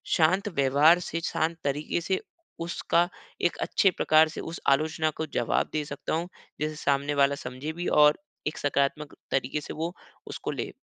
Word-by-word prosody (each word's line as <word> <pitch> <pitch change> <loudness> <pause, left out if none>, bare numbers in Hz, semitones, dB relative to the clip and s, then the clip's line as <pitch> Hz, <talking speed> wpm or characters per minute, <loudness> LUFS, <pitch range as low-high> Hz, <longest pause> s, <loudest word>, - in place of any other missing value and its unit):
शांत 185 +5 +3
व्यवहार 145 +6 +5
से, 165 -1 -4
शांत 165 0 -1
तरीक़े 145 +4 -1
से, 190 +2 0 0.4
उसका 170 0 +1 0.3
एक 175 - +1
अच्छे 195 - +3
प्रकार 155 +1 +5
से 155 - -6
उस 165 - -6
आलोचना 155 +3 +2
को 160 - -1
जवाब - - +1
दे 155 - 0
सकता 145 -1 -5
हूँ? 165 +2 -1 0.3
जैसे 155 0 -1
सामने 140 0 0
वाला 140 0 +4
समझे 130 +5 -5
भी 175 +2 -4
और 150 0 +5 0.3
एक 155 - -3
सकारात्मक 145 +1 0 0.2
तरीक़े 135 +3 0
से - - -7
वो 165 +3 -3 0.3
उसको - - -4
ले। - - -4
155 Hz, 170 wpm, -27 LUFS, 145-165 Hz, 0.4 s, व्यवहार